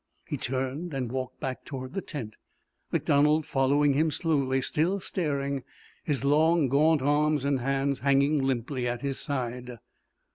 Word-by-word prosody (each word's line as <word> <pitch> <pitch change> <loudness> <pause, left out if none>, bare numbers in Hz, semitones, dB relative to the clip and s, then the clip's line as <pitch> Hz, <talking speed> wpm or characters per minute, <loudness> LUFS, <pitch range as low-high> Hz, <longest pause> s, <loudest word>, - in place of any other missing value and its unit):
He - - -3
turned 135 +5 -3
and 125 -3 -2
walked 130 -1 -4
back 130 -2 -4
toward 130 -2 -7
the 195 - -2
tent, 120 - -6 0.6
MacDonald 150 +2 +3
following 140 +2 +2
him 155 +3 +2
slowly, 140 -5 +1
still 165 +9 0
staring, 140 -7 -2 0.4
his 145 -4 -1
long 155 +1 +3
gaunt 150 +1 +3
arms 145 0 +2
and 140 -2 +1
hands 135 +1 0
hanging 140 +2 +3
limply 130 0 -1
at 120 +1 -3
his 140 -1 -2
side. 125 -2 -4
140 Hz, 145 wpm, -28 LUFS, 130-150 Hz, 0.6 s, MacDonald